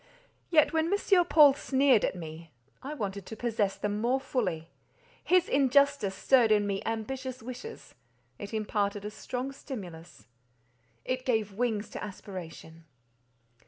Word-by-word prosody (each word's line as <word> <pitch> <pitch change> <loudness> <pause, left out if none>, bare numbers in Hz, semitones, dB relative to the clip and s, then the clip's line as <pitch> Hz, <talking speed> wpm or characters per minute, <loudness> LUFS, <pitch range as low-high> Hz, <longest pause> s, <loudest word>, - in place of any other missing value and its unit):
Yet, 310 -3 +4
when 320 +2 +1
M. 390 -3 +3
Paul 295 -5 +7
sneered 270 -4 +3
at - - 0
me, 165 -1 -9 0.3
I 290 +3 -6
wanted 200 -6 -4
to 220 - -7
possess 220 -4 -1
them 210 0 -3
more 250 +3 +1
fully; 185 -12 -3 0.5
his 365 0 +3
injustice 280 -6 +3
stirred 240 +1 +4
in 210 -1 +4
me 195 -1 -2
ambitious 255 +2 -4
wishes—it 125 - -11
imparted 205 -2 -2
a 210 - -4
strong 250 +4 -5
stimulus—it 125 - -9
gave 220 -5 0
wings 220 -1 -1
to - - -6
aspiration. 175 -5 -9
215 Hz, 125 wpm, -29 LUFS, 180-265 Hz, 0.5 s, Paul